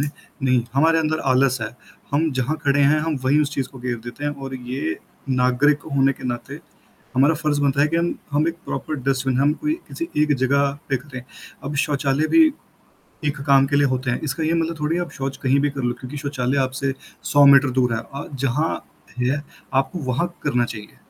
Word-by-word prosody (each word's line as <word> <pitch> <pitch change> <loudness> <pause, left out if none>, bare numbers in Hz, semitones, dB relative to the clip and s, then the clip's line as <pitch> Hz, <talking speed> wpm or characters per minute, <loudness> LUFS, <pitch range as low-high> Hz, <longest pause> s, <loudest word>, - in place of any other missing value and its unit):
दें, 145 - 0 0.3
नहीं, 125 -2 +3
हमारे 165 +3 +4
अंदर 155 0 0
आलस 130 -1 +3
है। 110 - -2 0.4
हम 155 +2 +2
जहाँ 145 +5 0
खड़े 140 +1 +3
हैं, 145 +2 +5
हम 160 -1 -1
वहीं 145 +3 +4
उस 145 - -2
चीज़ 135 -2 -2
को 130 - -13
गेर 125 -1 -2
देते 145 +5 -7
हैं 145 - +1
और 135 0 -5
ये 125 -9 -4 0.3
नागरिक 130 +3 +3
होने 135 0 +4
के - - -12
नाते 120 0 -5 0.6
हमारा 140 +5 +5
फ़र्ज़ 150 -2 0
बनता 140 0 +2
है 150 - +4
कि 165 - -1
हम 170 +1 +1 0.2
हम 150 +3 +2
1 165 - -1
प्रॉपर 155 - -3
डस्टबिन 135 -1 +1
हम 145 +2 +4
कोई 305 - +2
किसी 335 - -5
एक 150 -1 +3
जगह 140 +2 +2 0.2
पे 135 - +2
करें। 130 -1 -9 0.4
अब 145 +1 -4
शौचालय 145 0 0
भी 325 -1 +8 0.8
एक 150 -1 -1
काम 135 -1 +6
के 145 +1 +1
लिए 145 -1 +4
होते 130 -1 -1
हैं, 125 - -1
इसका 150 +1 -2
ये 160 - +1
मतलब 165 -1 -1
थोड़ी 155 +3 0
आप 175 -1 -3
शौच 135 -1 -4
कहीं 135 +1 +3
भी 145 +1 +1
कर 135 -1 -5
लो, 120 0 0
क्योंकि 130 +3 -7
शौचालय 140 -2 -1
आपसे 130 +1 -2 0.4
100 145 0 +7
मीटर 140 -1 +7
दूर 125 -2 +2
है 110 - -1
अ, 140 - -5
जहाँ 135 +4 0 0.5
है, 130 +4 0 0.3
आपको 135 +6 +1
वहाँ 170 +7 -1
करना 120 0 +2
चाहिए। 105 -3 -8
140 Hz, 210 wpm, -22 LUFS, 130-150 Hz, 0.8 s, भी